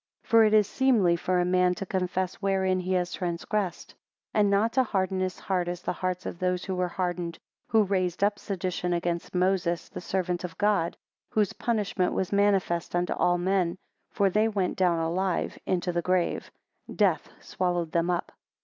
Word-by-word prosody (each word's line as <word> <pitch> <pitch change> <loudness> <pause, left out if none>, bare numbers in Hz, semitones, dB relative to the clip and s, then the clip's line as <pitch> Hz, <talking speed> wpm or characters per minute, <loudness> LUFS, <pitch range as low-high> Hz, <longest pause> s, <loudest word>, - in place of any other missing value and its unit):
4 - - -26
For - - +8
it 215 - +2
is 210 -1 +5
seemly 215 -7 +3
for 180 +1 0
a 175 - +2
man 180 0 +3
to 195 - -5
confess 185 -1 -1
wherein 190 -1 +1
he 185 +1 -2
has 180 -1 0
transgressed. 180 +1 -2 0.4
5 - - +1
And 205 -1 +4
not 210 +3 +2
to 260 - +4
harden 190 -4 -1
his 185 0 -2
heart, 180 -2 -1
as 175 0 -4
the - - -1
hearts 185 0 -3
of 170 - -5
those 180 0 -1
were 180 -1 0
hardened, 175 -2 -3 0.3
who 220 -1 +4
raised 185 -2 0
up 205 0 +2
sedition 180 -2 -2
against 170 0 -2
Moses 180 -2 +1
the - - -7
servant 180 -1 -2
of 180 - -6
God 205 -5 +1 0.3
whose 210 -3 +1
punishment 210 -5 0
was 190 0 -1
manifest 195 -4 +1
unto 175 0 +1
all 175 0 +2
men, 180 -1 0 0.3
for 200 -1 +1
they 215 +3 +3
went 200 -4 -1
down 180 -3 +2
alive 175 +3 -1
into 180 -1 0
the 175 0 0
grave; 180 0 0 0.5
death - - +2
swallowed 175 -3 -2
them 170 +1 +1
up. 175 -1 -1
185 Hz, 185 wpm, -27 LUFS, 175-195 Hz, 0.5 s, For